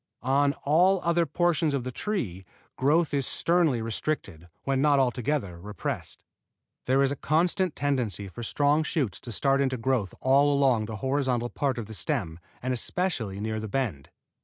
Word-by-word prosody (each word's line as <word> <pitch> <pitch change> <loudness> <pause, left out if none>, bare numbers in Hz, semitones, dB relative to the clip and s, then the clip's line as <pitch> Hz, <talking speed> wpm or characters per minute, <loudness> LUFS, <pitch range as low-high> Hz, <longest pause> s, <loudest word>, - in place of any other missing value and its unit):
On 140 +2 +3
all 180 +6 +4
other 170 0 +2
portions 165 -1 +1
of 135 - -2
the 130 - -4
tree 120 - -3 0.3
growth 150 +4 +2
is 140 -2 +1
sternly 165 -9 +2
restricted, 110 - -3 0.2
when 135 -1 0
not 145 -1 +4
altogether 125 - 0
repressed. 105 -1 -5 0.6
There 135 +2 +4
is 135 - +2
a - - -1
constant 175 +5 +1
tendency 125 -8 -1
for 95 +5 -9
strong 145 +6 +2
shoots 145 - -1
to 120 - -8
start 135 +4 +2
into 130 -2 0
growth 115 -6 -1
all 140 +2 +4
along 135 -6 +3
the 110 0 -6
horizontal 130 -3 0
part 135 -4 -1
of 115 - -4
the 110 - -9
stem 80 -2 -2 0.2
and 130 0 0
especially 125 - -2
near 110 +1 -2
the 110 - -5
bend. 105 - -2
135 Hz, 165 wpm, -27 LUFS, 115-150 Hz, 0.6 s, all